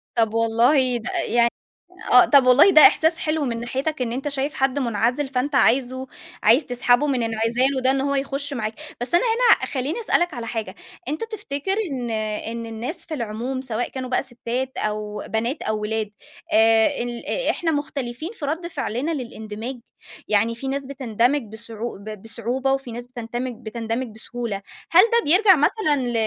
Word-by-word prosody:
طَب 225 -2 +2
والله 240 +3 +3
ده 235 - -6 0.2
يعني 235 +1 +3 0.6
آه 250 - +8
طَب 275 -3 +5
والله 255 +9 +7
ده 310 -5 +8
إحساس 320 +3 +6
حلو 310 -2 -1
من 230 -2 -2
ناحيتك 265 +5 -3
إن 235 -2 -1
أنت 265 +4 -3
شايف 280 +1 -2
حد 270 +1 0
منعزل 240 +3 0
فأنت 265 +2 -2
عايزه 260 0 +2 0.4
عايز 240 +8 +5
تسحبه 245 +3 +2
من 255 -4 0
انعزاله 235 +4 0
ده 260 +1 +3
إن 270 0 0
هو 280 +1 0
يخُش 280 +1 -2
معاك، 220 -4 -3 0.3
بس 245 - -1
أنا 350 - +4
هنا 465 +1 +4
خلّيني 280 - -3
أسألك 350 -6 +1
على 235 -2 -5
حاجة، 225 -2 -4 0.3
أنت 305 +10 -3
تفتكر 385 -6 -3 0.2
إن 245 -3 -3
آآ 215 0 -3
إن 230 0 -5
الناس 230 +9 -5
في 325 - -7
العموم 245 +1 -3
سواء 245 -2 -3
كانوا 260 -1 -6
بقى 250 - +1
ستّات 255 +1 -4
أو 210 -1 -3
بنات 230 +6 -2
أو 215 0 -1
ولاد 215 0 -2 0.4
آآ 225 +5 +4
ال 240 -1 -6 0.2
إحنا 330 -2 0
مختلفين 290 -1 -3
في 300 - -6
رد 325 +4 -2
فعْلنا 285 -2 -3
للاندماج؟ 235 -2 -6 0.5
يعني 225 +2 +2
فيه 270 +4 -6
ناس 275 0 -2
بتندمج 260 0 0
بصعوب 220 -1 -7
بصعوبة 230 +5 -2
وفيه 270 -3 -3
ناس 240 +1 -7
بتندمج- 245 0 -5
بتندمج 230 +3 -3
بسهولة، 225 -3 -5 0.3
هل 340 - +8
ده 470 0 +3
بيرجع 380 +1 +7
مثلًا 305 +1 +2
ل 245 -1 -2
250 Hz, 170 wpm, -22 LUFS, 230-280 Hz, 0.6 s, آه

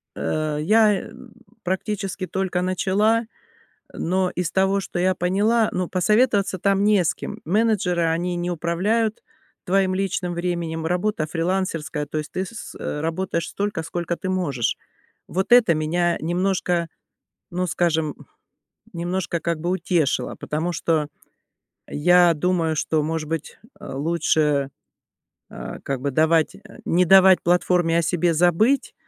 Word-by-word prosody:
э, 150 - -2
э, - - -2
я, 215 +4 +5
э, - - -10 0.5
практически 190 0 -3
только 190 -1 -1
начала, 200 +5 +1 0.7
но 185 +1 0
из 175 -1 -2
того, 195 +1 +2
что 175 - -5
я 185 +1 +2
поняла, 210 +6 +1
ну, 180 -1 -2
посоветоваться 200 +1 +2
там 195 +2 +2
не 205 -2 +4
с - - +1
кем. - - -7
Менеджеры, 195 -2 +1
они 175 +2 0
не 175 +1 -2
управляют 195 +7 -1 0.4
твоим 190 0 +2
личным 185 -2 -2
временем, 170 -2 -3
работа 180 -1 -1
фрилансерская, 165 -3 -2
то 155 - -4
есть 150 - -6
ты 185 - -2
с - - -9
с 230 - -9
э, 150 - -4
работаешь 165 +2 -2
столько, 205 -4 -3
сколько 170 +1 -3
ты 185 - -5
можешь. 145 -11 -1 0.5
Вот 190 +6 -2
это 230 -9 +6
меня 170 +3 0
немножко, 175 0 0 0.6
ну, 180 +1 -1
скажем, 160 -2 0 0.8
немножко 175 0 -2
как 170 -1 -2
бы 175 - -2
утешило, 175 -5 0
потому 165 +4 -3
что 155 -2 0 0.8
я 175 +2 +4
думаю, 165 0 0
что, 155 0 0
может 155 0 -3
быть, 160 -1 -5 0.2
э, - - -8
лучше, 150 -1 +1 0.8
э, - - -7
как 135 -2 -3
бы 140 +2 -1
давать 160 +3 +2 0.3
не 180 +2 +3
давать 190 0 +6
платформе 175 -1 +2
о - - +2
себе 175 +1 +1
забыть 180 - +2
175 Hz, 140 wpm, -22 LUFS, 165-190 Hz, 0.8 s, это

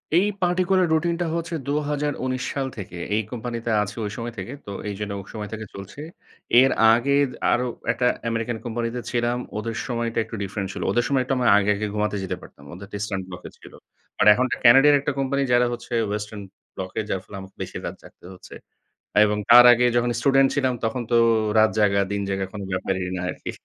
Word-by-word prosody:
এই 185 +4 +5 0.2
পার্টিকুলার 180 0 +2
রুটিনটা 170 +2 0
হচ্ছে 165 0 -4
২০১৯ 145 -3 -2
সাল 135 -1 -2
থেকে, 90 -3 -7 0.2
এই 110 - +2
কোম্পানিতে 120 -1 -4
আছি 105 0 -4
ওই 105 - -4
সময় 115 0 -5
থেকে। 95 +8 -6
তো 100 - -7 0.2
এইজন্য 100 0 -5
ওই 95 - -9
সময় 105 -2 -6
থেকে 110 0 -6
চলছে। 100 +9 -9 0.6
এর 135 - +4 0.2
আগে 140 +3 +2 0.2
আরো 125 +1 +1 0.3
একটা 125 +1 -1 0.2
আমেরিকান 115 0 -2
কোম্পানিতে 120 +1 -3
ছিলাম। 120 0 0 0.2
ওদের 115 +1 -4
সময়টা 115 -2 -3
একটু 115 0 -8
ডিফরেন্ট 100 0 -4
ছিল। - - -6
ওদের 120 - +2
সময় 135 -2 +1
একটু 135 - -2 0.2
আগে, 105 0 +1
আগে 105 +1 -3
ঘুমাতে 105 -1 -1
যেতে 95 - -3
পারতাম। 70 - -15
ওদেরটা 100 +3 -10
ইস্টার্ন 100 -2 -3
ব্লক 90 -1 -9
এ - - -9
ছিল। - - -15 0.5
আর 105 - +4
এখনকার 125 +3 -1
ক্যানাডিয়ান 135 +5 +7
একটা 145 - -1
কোম্পানি 140 +1 0
যারা 120 0 +4
হচ্ছে 120 +1 -8
ওয়েস্টার্ন 105 0 -5 0.3
ব্লক 95 0 -5
এ। - - +1
যার 95 - -1
ফলে 100 - -12
আমাকে 95 0 -13
বেশি - - -5
রাত - - -5
জাগতে - - -17
হচ্ছে 90 - -14 0.7
এবং 105 0 +1
তার 120 +1 +10
আগে 120 +1 +3
যখন 120 0 +2
স্টুডেন্ট 135 +1 +4
ছিলাম 130 -3 +1
তখন 120 +2 -1
তো 120 - +3 0.4
রাত 110 0 +5
জাগা, 100 -1 +3
দিন 100 - -1
জায়গা 95 0 -1
কোনো 100 -2 -6
ব্যাপারই 95 0 -2
না 90 - -4
আরকি। - - -7
115 Hz, 195 wpm, -23 LUFS, 105-135 Hz, 0.7 s, তার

